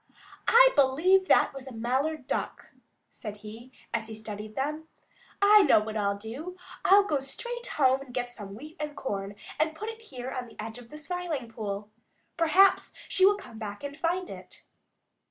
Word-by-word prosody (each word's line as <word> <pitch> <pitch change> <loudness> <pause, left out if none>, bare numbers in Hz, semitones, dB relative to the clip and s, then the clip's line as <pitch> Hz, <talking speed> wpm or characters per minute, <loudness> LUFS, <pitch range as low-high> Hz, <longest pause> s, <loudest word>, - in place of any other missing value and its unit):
"I - - +8
believe 330 +8 +4
that - - +4
was 270 -1 -9
a - - -7
Mallard 265 +5 -1
Duck," - - -4 0.4
said 210 -2 -7
he, 230 +4 -10 0.2
as 225 -1 -1
he 220 - -7
studied 215 0 -7
them. 300 +4 -2 0.6
"I 420 +1 +8
know 285 - +6
what 215 +1 -5
I'll 200 -1 0
do. 270 - -7 0.3
I'll 400 +1 +7
go 305 -8 0
straight 475 - -5
back - - -6
home 260 +1 +2
and 275 -2 -10
get 245 -1 -3
some 200 -4 -9
wheat 305 - -11
and 300 -1 -4
corn 200 -4 -4 0.2
and 315 0 +1
put 430 +7 -5
it 450 0 -8
here 260 - -7
on 250 -2 -4
the - - -17
edge 225 +2 -6
of 235 -1 -14
the 300 - -9
Smiling 315 -6 -4
Pool. 210 -2 -5 0.4
Perhaps 350 +4 +4
she 380 0 +5
will 405 0 +4
come 225 - -11
back 205 0 -6
and 285 0 -5
find 350 +3 -1
it." - - -11
270 Hz, 190 wpm, -28 LUFS, 220-335 Hz, 0.6 s, I